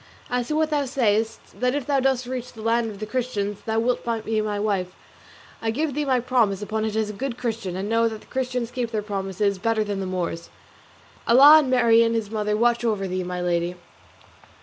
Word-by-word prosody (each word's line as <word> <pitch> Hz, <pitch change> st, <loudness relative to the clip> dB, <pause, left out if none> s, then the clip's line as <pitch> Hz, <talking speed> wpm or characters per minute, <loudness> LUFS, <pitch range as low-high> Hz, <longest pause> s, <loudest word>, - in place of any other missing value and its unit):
As 245 Hz, -1 st, 0 dB
to 305 Hz, -, -1 dB
what 315 Hz, 0 st, +1 dB
thou 290 Hz, -2 st, +1 dB
sayest, 225 Hz, -4 st, -1 dB
that 250 Hz, +2 st, +1 dB
if 290 Hz, -3 st, -2 dB
thou 280 Hz, -1 st, +2 dB
dost 260 Hz, -1 st, +1 dB
reach 250 Hz, 0 st, -5 dB
the 220 Hz, -, -10 dB
land 230 Hz, 0 st, +1 dB
of 205 Hz, -, -8 dB
the 215 Hz, -, -5 dB
Christians 215 Hz, -4 st, -2 dB
thou 220 Hz, 0 st, 0 dB
wilt 240 Hz, +2 st, +1 dB, 0.2 s
be 220 Hz, -1 st, 0 dB
my 210 Hz, -1 st, -2 dB
wife, 195 Hz, -3 st, -1 dB, 0.7 s
I 225 Hz, -, -1 dB
give 290 Hz, +6 st, -1 dB
thee 295 Hz, +2 st, -1 dB
my 260 Hz, -2 st, +2 dB
promise 235 Hz, -6 st, +1 dB
upon 215 Hz, +1 st, -2 dB
it 215 Hz, -1 st, -3 dB
as 220 Hz, -1 st, 0 dB
a -, -, -10 dB
good 250 Hz, +3 st, -4 dB
Christian; 225 Hz, -7 st, -3 dB
and 190 Hz, +2 st, -3 dB
know 230 Hz, +1 st, +2 dB
that 220 Hz, -1 st, -5 dB
the -, -, -18 dB
Christians 250 Hz, -2 st, -3 dB
keep 245 Hz, -2 st, -2 dB
their 215 Hz, -2 st, -2 dB
promises 195 Hz, -1 st, -2 dB
better 225 Hz, +2 st, +1 dB
than 205 Hz, -2 st, -3 dB
the 190 Hz, -, -3 dB
Moors. 175 Hz, -2 st, -3 dB, 0.8 s
Allah 285 Hz, +6 st, +9 dB
and 280 Hz, -4 st, -1 dB
Marien 230 Hz, -2 st, +4 dB
his 220 Hz, -2 st, -2 dB
mother 210 Hz, -1 st, -1 dB
watch 240 Hz, +1 st, +2 dB
over 210 Hz, -4 st, 0 dB
thee, 185 Hz, 0 st, -2 dB
my 180 Hz, 0 st, -4 dB
Lady." 175 Hz, 0 st, 0 dB
225 Hz, 215 wpm, -24 LUFS, 205-250 Hz, 0.8 s, Allah